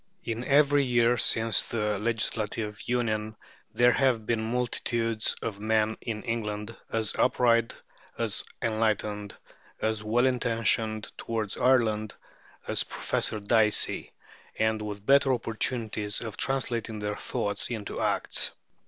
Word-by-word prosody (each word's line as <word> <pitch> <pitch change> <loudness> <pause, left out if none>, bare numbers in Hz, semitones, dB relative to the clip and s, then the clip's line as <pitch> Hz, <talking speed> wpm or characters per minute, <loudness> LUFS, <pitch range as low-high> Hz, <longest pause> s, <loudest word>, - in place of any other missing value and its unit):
In 115 0 -3
every 145 +1 +4
year 120 -1 +3
since 115 0 +3
the 105 -3 -2
Legislative 110 -1 -2
Union 110 -3 -1 0.4
there 120 0 +4
have 125 -4 +2
been 110 0 -1
multitudes 115 -2 0
of 105 -3 -4
men 110 0 +1
in 110 -3 -4
England 110 -1 -3 0.2
as 110 -2 +1
upright, 115 -2 +2 0.4
as - - +1 0.2
enlightened, 105 -2 -1 0.4
as 110 -1 -1
well 115 +4 +2
intentioned 115 -3 +1
towards 110 -3 -2
Ireland, 110 -5 +2 0.5
as - - +2
Professor 110 - -1
Dicey, 105 +1 +2 0.5
and 110 0 +1
with 105 -1 -6
better 140 +1 +5
opportunities 110 -3 -1
of 110 -3 -5
translating 120 -4 -1
their 105 0 -3
thoughts 100 0 -3
into 110 -4 -4
acts. - - 0
110 Hz, 120 wpm, -28 LUFS, 105-120 Hz, 0.5 s, better